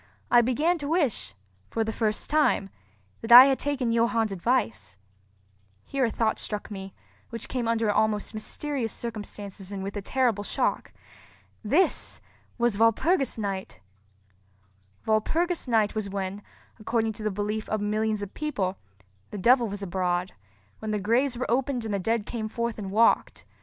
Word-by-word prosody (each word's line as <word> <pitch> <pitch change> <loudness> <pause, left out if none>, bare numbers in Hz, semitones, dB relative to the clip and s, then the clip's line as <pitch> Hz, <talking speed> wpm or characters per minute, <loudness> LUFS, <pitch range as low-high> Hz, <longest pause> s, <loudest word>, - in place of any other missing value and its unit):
I 240 - +7
began 300 +9 +1
to 285 - -4
wish, 285 - 0 0.3
for 225 - 0
the 220 0 -3
first 215 -2 -1
time, 300 -10 +2 0.5
that 225 - -5
I 245 +2 +13
had 270 -1 +2
taken 275 -5 -1
Johann's 230 -2 +2
advice. 170 - -1 0.9
Here 270 -2 0
a - - +1
thought 220 0 0
struck 210 0 -5
me, 195 -1 -7 0.3
which 230 -1 -4
came 245 -3 -2
under 230 -2 +1
almost 215 0 0
mysterious 240 +2 -3
circumstances 205 -4 -7
and 195 -1 -4
with 200 +2 -5
a 205 - -3
terrible 230 -2 0
shock. - - -1 0.7
This 305 - +1 0.4
was 235 -4 +1
Walpurgis 265 - +2
Night! 195 - -4 1.3
Walpurgis 320 +11 +1
Night 220 -3 +2
was 215 -2 -3
when, 195 0 -4 0.4
according 225 0 0
to 215 - -11
the 215 - 0
belief 210 +2 -3
of 215 - 0
millions 215 0 -1
of 200 - -8
people, 210 -12 -2 0.5
the 210 - -6
devil 240 +4 +4
was 200 -1 -6
abroad—when 175 - -4
the 215 - 0
graves 235 +6 +1
were 255 - -2
opened 255 0 0
and 215 - -3
the 200 - 0
dead 225 +2 0
came 220 -2 -4
forth 235 0 -3
and 195 -2 -5
walked. 220 +4 +2
220 Hz, 155 wpm, -26 LUFS, 200-240 Hz, 1.3 s, I